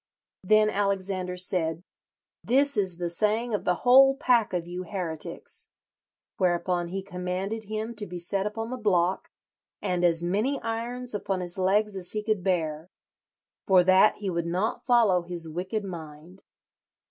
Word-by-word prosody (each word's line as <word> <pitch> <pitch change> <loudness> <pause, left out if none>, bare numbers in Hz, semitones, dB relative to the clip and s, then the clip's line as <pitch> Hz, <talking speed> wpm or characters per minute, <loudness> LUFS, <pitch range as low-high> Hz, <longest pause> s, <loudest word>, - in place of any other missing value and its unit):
Then 215 +2 +4
Alexander 190 -2 -1
said, 170 -2 -2 0.6
'This 280 +3 +2
is 190 -5 0
the 175 -1 -2
saying 215 +6 +1
of 205 - -2
the 180 - +2
whole 270 +2 +7
pack 240 -6 +2
of 175 -2 -2
you 175 +1 -5
heretics.' 175 -6 -4 0.7
Whereupon 175 -2 0
he 190 +2 -4
commanded 190 +3 -4
him 215 +2 -4
to 205 -1 -4
be 180 - -6
set 190 +3 0
upon 225 +2 -5
the 255 - -3
block, 185 -5 +1 0.5
and 180 -1 -1
as 170 -1 +3
many 215 +11 0
irons 240 +2 -3
upon 195 -2 -2
his 175 +1 -4
legs 205 +2 +2
as 180 -2 -4
he 215 -1 -2
could 215 -4 -1
bear, 165 -3 -1 0.8
for 185 -2 +6
that 190 +3 +5
he 200 -3 -4
would 170 -1 -2
not 190 +11 -2
follow 225 -7 +4
his 170 -1 -3
wicked 185 +6 -3
mind. 165 0 -9
190 Hz, 155 wpm, -27 LUFS, 175-215 Hz, 0.8 s, whole